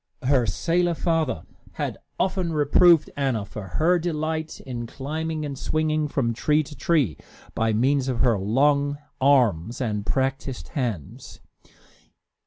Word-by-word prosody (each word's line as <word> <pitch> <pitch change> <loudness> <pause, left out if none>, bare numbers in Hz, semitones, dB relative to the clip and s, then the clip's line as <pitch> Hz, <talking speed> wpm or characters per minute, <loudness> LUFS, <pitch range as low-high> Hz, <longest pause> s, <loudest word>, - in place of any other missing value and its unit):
Her 130 -3 +3
sailor 170 - +1
father 160 - 0 0.3
had - - -4 0.2
often 185 -3 0
reproved 155 +2 +5
Anna 130 -7 -1
for 100 -1 -8
her 175 +3 +3
delight 160 -1 -3
in 120 -3 -6
climbing 155 +4 -4
and 140 -1 -4
swinging 155 +2 0
from 125 -5 0
tree 150 +6 +2
to 150 +1 -11
tree, 140 - +1 0.4
by 115 0 +1
means 130 +4 +2
of 125 -3 -1
her 115 -5 +3
long 140 +7 +2 0.2
arms 120 - +3
and 105 -5 -2
practised 135 - -2
hands. 115 - -5
140 Hz, 130 wpm, -24 LUFS, 120-155 Hz, 0.4 s, reproved